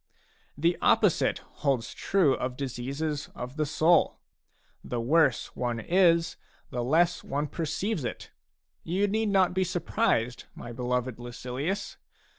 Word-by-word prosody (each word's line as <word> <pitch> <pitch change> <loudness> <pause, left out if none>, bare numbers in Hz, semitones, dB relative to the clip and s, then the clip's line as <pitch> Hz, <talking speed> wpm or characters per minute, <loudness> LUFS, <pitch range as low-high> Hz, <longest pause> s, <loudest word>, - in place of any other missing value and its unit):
The 170 +4 +1
opposite - - +3 0.2
holds 135 -5 0
true 180 -9 +2
of 125 -1 -3
diseases 140 +3 -3
of 125 +2 -6
the 155 -1 0
soul; 160 +3 +3 0.7
the 120 - -3
worse 140 +2 +2
one 120 -2 -2
is, 170 +3 +3 0.3
the 120 -1 -2
less 170 +7 +2
one 145 +2 -2
perceives 165 +4 -2
it. 120 - -5 0.5
You 190 +5 +1
need 220 +1 0
not 190 -2 +3
be 190 +1 +2
surprised, 125 -9 0
my 120 - -8
beloved 125 0 -2
Lucilius. 125 +9 -4
145 Hz, 125 wpm, -28 LUFS, 125-175 Hz, 0.7 s, opposite